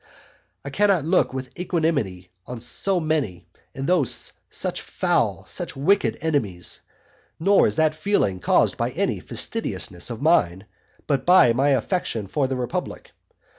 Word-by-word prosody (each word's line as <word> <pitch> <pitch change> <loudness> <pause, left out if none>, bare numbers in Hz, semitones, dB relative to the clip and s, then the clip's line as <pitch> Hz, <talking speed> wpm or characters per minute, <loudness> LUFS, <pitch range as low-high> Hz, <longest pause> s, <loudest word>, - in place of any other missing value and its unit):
I 140 - -5
cannot 195 -2 +2
look 180 +3 +2
with 130 -1 -6
equanimity 145 - -1 0.2
on 125 -1 -6
so 180 +10 0
many, 150 - -2 0.3
and 135 - -4
those 170 -7 +2 0.2
such - - -3
foul, - - -1
such - - -4
wicked 140 - +2
enemies; 115 - -1 0.6
nor 195 +4 +4
is - - -2
that 155 -1 +2
feeling 155 - 0
caused - - +2
by - - 0
any - - -1
fastidiousness 85 +4 -3
of 115 -2 -6
mine, 105 - +2 0.4
but 140 -2 0
by 175 -10 +6
my 135 +4 +2
affection 135 - -1
for 135 +7 -1
the 130 - -2
republic. 125 -1 -4
140 Hz, 140 wpm, -23 LUFS, 115-170 Hz, 0.6 s, by